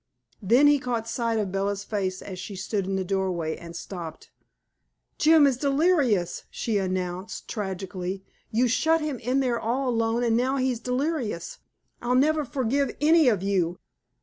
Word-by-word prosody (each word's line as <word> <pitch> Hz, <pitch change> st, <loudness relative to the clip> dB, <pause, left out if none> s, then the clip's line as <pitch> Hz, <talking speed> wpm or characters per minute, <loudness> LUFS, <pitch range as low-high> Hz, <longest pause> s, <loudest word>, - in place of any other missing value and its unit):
Then 235 Hz, +8 st, +5 dB
he 290 Hz, -1 st, +6 dB
caught 235 Hz, -3 st, -2 dB
sight 230 Hz, -1 st, -1 dB
of 205 Hz, -4 st, -1 dB
Bella's 200 Hz, +1 st, -1 dB
face 190 Hz, -3 st, -3 dB
as 185 Hz, -2 st, -7 dB
she 195 Hz, +2 st, -7 dB
stood 195 Hz, +1 st, -2 dB
in 195 Hz, -, -1 dB
the 190 Hz, -, 0 dB
doorway, 180 Hz, -4 st, -1 dB
and 170 Hz, 0 st, -10 dB
stopped. 170 Hz, -2 st, -8 dB, 0.9 s
"Jim 315 Hz, -1 st, +6 dB
is 270 Hz, -3 st, +2 dB
delirious!" 275 Hz, -, +1 dB
she 220 Hz, -3 st, -1 dB
announced 185 Hz, 0 st, -3 dB
tragically. 190 Hz, -2 st, -4 dB, 0.2 s
"You 245 Hz, +3 st, +2 dB
shut 320 Hz, +7 st, +2 dB
him 300 Hz, -4 st, -3 dB
in 255 Hz, +3 st, 0 dB
there 245 Hz, -3 st, 0 dB
all 250 Hz, +4 st, -1 dB
alone 230 Hz, 0 st, +1 dB
and 230 Hz, -1 st, +2 dB
now 260 Hz, +3 st, +1 dB
he's 255 Hz, -3 st, 0 dB
delirious. 250 Hz, -, -2 dB, 0.4 s
I'll 245 Hz, +1 st, +1 dB
never 305 Hz, +4 st, +3 dB
forgive 270 Hz, 0 st, -1 dB
any 315 Hz, 0 st, +5 dB
of 205 Hz, -5 st, 0 dB
you." 180 Hz, -3 st, 0 dB
230 Hz, 160 wpm, -26 LUFS, 190-265 Hz, 0.9 s, he